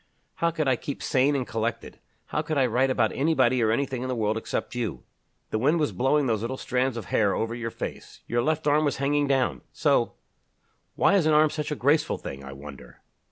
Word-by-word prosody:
"How 170 - +2
could 160 -3 -2
I 130 -2 +3
keep 140 - -6
sane 135 +2 +2
and 130 -2 -1
collected! 115 0 -4 0.3
How 150 - -2
could 155 -1 -3
I 135 - +4
write 125 +3 +2
about 110 -4 +2
anybody 130 -4 +2
or 110 - +3
anything 130 +2 -1
in 130 - -3
the 130 - -2
world 110 -1 0
except 110 - -3
you! 110 - -3 0.5
The 110 - 0
wind 150 +8 +2
was 150 - +1
blowing 135 +3 +2
those 110 -4 0
little 125 +3 -3
strands 130 -1 -1
of 115 - -5
hair 100 -3 +3
over 115 +1 -2
your 115 -1 -4
face. - - -7
Your 120 0 0
left 155 +4 0
arm 150 +1 +3
was 145 - 0
hanging 145 +1 +1
down 135 -2 +1
so; - - +1 0.8
why - - +3
is 185 -6 +3
an 155 - +4
arm 155 0 +5
such 150 -1 -3
a 150 - -2
graceful 145 +4 +2
thing, 70 0 -8
I 70 - -8
wonder? 70 -3 -12
130 Hz, 220 wpm, -26 LUFS, 115-145 Hz, 0.8 s, arm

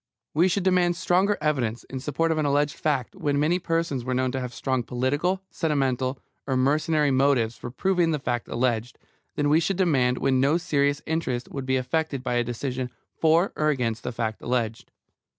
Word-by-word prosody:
We 170 +5 +4
should 190 +1 0
demand 180 -2 +3
stronger 185 +3 +2
evidence 130 -7 0
in 135 - -7
support 150 +5 0
of 160 - 0
an 155 - +1
alleged 145 +1 +2
fact 140 -5 -1
when 145 -1 0
many 165 +5 +2
persons 165 -7 -1
were 130 +1 -2
known 130 0 +1
to 135 - -2
have 125 -1 -4
strong 130 +1 -1
political, 145 +11 -1
sentimental, 135 -4 0 0.3
or 130 -2 +1
mercenary 150 +2 +2
motives 130 -4 +2
for - - -7
proving 175 +5 +1
the 155 - +1
fact 120 -4 -2
alleged, 120 -1 -1 0.4
than 145 - +1
we 150 +2 +5
should 190 +2 -1
demand 135 -9 +2
when 130 -1 +2
no 145 +5 +3
serious 145 -4 0
interest 150 -7 -2
would 135 -2 -5
be 130 0 +2
affected 140 +1 -1
by 125 - -1
a 120 0 +2
decision 125 +1 -3 0.3
for 165 +4 +3
or 155 0 +1
against 120 -6 -1
the 125 - -4
fact 110 -2 -3
alleged. 115 -2 -2
140 Hz, 190 wpm, -25 LUFS, 125-160 Hz, 0.4 s, we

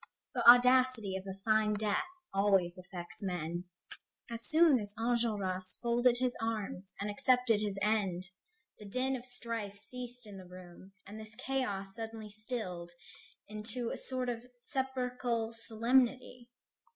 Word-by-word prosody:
The 245 - -1
audacity 250 -4 +5
of 190 +1 -6
a 190 - -5
fine 215 -1 +3
death 210 -1 0 0.3
always 195 -3 +2
affects 180 0 -8
men. 175 -2 -3 0.7
As 230 0 -4
soon 315 -4 +5
as 205 -1 -6
Enjolras 210 -6 0
folded 240 +1 +2
his 250 0 0
arms 205 -4 -4
and 200 - -2
accepted 250 -2 +5
his 205 -2 -2
end, 195 -4 0 0.5
the 210 - -10
din 255 +6 -1
of 250 0 -8
strife 230 -4 -5
ceased 245 +2 -8
in 200 -2 -10
the 185 - -12
room, 180 +1 -13
and 210 +2 -9
this 215 0 -9
chaos 205 -8 -3
suddenly 225 -1 -7
stilled 210 -6 -5 0.6
into 215 +3 +3
a - - -3
sort 255 -1 -2
of 240 0 -5
sepulchral 250 -3 -2
solemnity. 240 +2 +1
220 Hz, 140 wpm, -33 LUFS, 195-245 Hz, 0.7 s, audacity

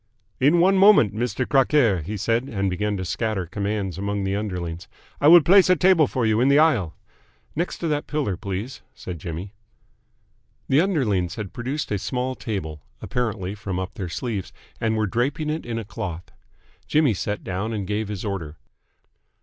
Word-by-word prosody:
"In 150 +6 +4
one 190 +2 +4
moment, 195 - +6
Mister 120 +2 -1
Crockaire!" 130 - +3
he 105 +8 -5
said, 115 +4 0
and 100 -3 -1
began 105 +2 -1
to 95 - -4
scatter 105 0 -2
commands 100 +1 -3
among 100 0 -2
the 95 0 -1
underlings. 90 -4 -4 0.3
"I 145 - +3
will 170 +2 +9
place 185 +4 +6
a 185 - +6
table 180 -3 +4
for 125 -2 -1
you 110 +1 +2
in 130 - +4
the 140 +1 +5
aisle." 125 - +3 0.6
"Next 170 +4 -2
to 170 - -3
that 150 -1 -1
pillar, 145 -11 -1
please," 100 +8 -5
said 90 -3 -7
Jimmy. 85 +6 -6 1.1
The 135 +3 +4
underlings 105 - 0
had 105 -4 -6
produced 130 +3 -4
a 100 - 0
small 125 +5 -2
table 80 - -5 0.2
apparently 110 -6 -3
from 100 -3 -5
up 95 0 -4
their 90 -3 -5
sleeves, 100 +2 -4 0.3
and 110 -1 0
were 110 - +1
draping 140 - -1
it 155 -4 -4
in 115 -1 -3
a 115 - -4
cloth. 95 -5 -6 0.6
Jimmy 150 -6 +3
sat 105 +2 -3
down 95 +5 -3
and 105 -3 -3
gave 105 +2 -2
his 105 0 -5
order. 85 -7 -4
110 Hz, 180 wpm, -23 LUFS, 95-135 Hz, 1.1 s, will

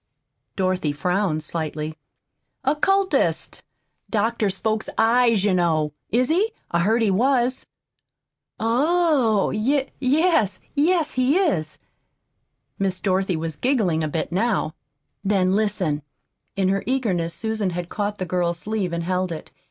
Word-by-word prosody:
Dorothy 185 -5 0
frowned 180 0 0
slightly. 155 -1 -4 0.7
"Occultist 380 +8 +1 0.5
doctors 215 -2 0
folks' 220 +1 -1
eyes, 230 -2 +4
you 205 -2 +2
know. 160 -4 +1 0.2
Is 250 +4 +2
he? 405 +8 +2 0.2
I 170 - +2
heard 220 +6 +2
he 210 - +3
was." 255 +4 +1 0.9
"Oh! 260 - +2
Y 265 +6 0
yes 270 - +2
yes, 315 +1 +2
he 255 +5 +2
is." 170 - 0 1.0
Miss 190 -2 -1
Dorothy 190 -1 0
was 160 -1 -4
giggling 210 - +1
a - - 0
bit 160 +3 -3
now. 195 -4 0 0.5
"Then, 190 -2 +2
listen!" 190 -8 0 0.5
In 190 -1 +1
her 195 0 +1
eagerness 190 -11 0
Susan 220 -2 -1
had 175 -1 -4
caught 205 0 -2
the 185 - -3
girl's 175 -1 0
sleeve 205 -2 -2
and 170 0 -2
held 180 +1 -1
it. 160 - -7
205 Hz, 130 wpm, -23 LUFS, 175-250 Hz, 1.0 s, eyes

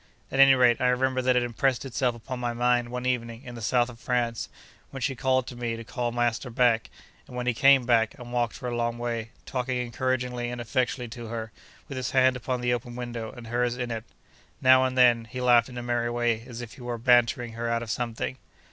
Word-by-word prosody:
At 135 - -2
any 135 -1 +8
rate, 125 -2 +4
I 125 - +3
remember 130 +1 +1
that 130 0 +2
it 125 - +3
impressed 125 +2 0
itself 125 -1 0
upon 125 +2 -6
my 120 -1 -2
mind 120 0 +1
one 125 +1 -4
evening 115 -1 -2
in 125 - -9
the 120 - -8
South 120 +3 +2
of 120 -2 -11
France, 120 -2 -1 0.4
when 135 - -7
she 135 +2 -1
called 130 0 +1
to 125 - -8
me 120 -1 -3
to 115 - -7
call 120 0 -3
master 120 +1 -1
back; 120 -2 +2 0.4
and - - -11
when 125 0 -3
he 125 - +2
came 135 +1 +5
back, 115 -2 +2
and 120 -1 -10
walked 120 -1 0
for 125 - -6
a 120 - -2
long 120 0 -1
way, 115 -1 -3 0.2
talking 125 0 -2
encouragingly 125 0 -2
and 120 0 -5
affectionately 125 0 -1
to 120 0 -8
her, 110 -1 -5 0.4
with 140 - -6
his 130 -2 -2
hand 130 -1 +4
upon 125 0 -3
the 125 0 +1
open 120 0 -4
window, 120 -2 -5
and 120 -2 -10
hers 120 +1 -1
in 125 -1 -3
it. 115 -1 -4 0.6
Now 130 0 +6
and 130 0 -2
then, 120 -2 +5
he 125 +3 -7
laughed 120 -1 +4
in 125 - -9
a 120 - -4
merry 120 -1 0
way, 120 -1 0
as 120 -1 -7
if 120 -2 -8
he - - -14
were 120 -1 -4
bantering 120 -1 +3
her 115 +1 -3
out 115 0 0
of 110 - -5
something. 110 - -3
120 Hz, 235 wpm, -27 LUFS, 120-125 Hz, 0.6 s, any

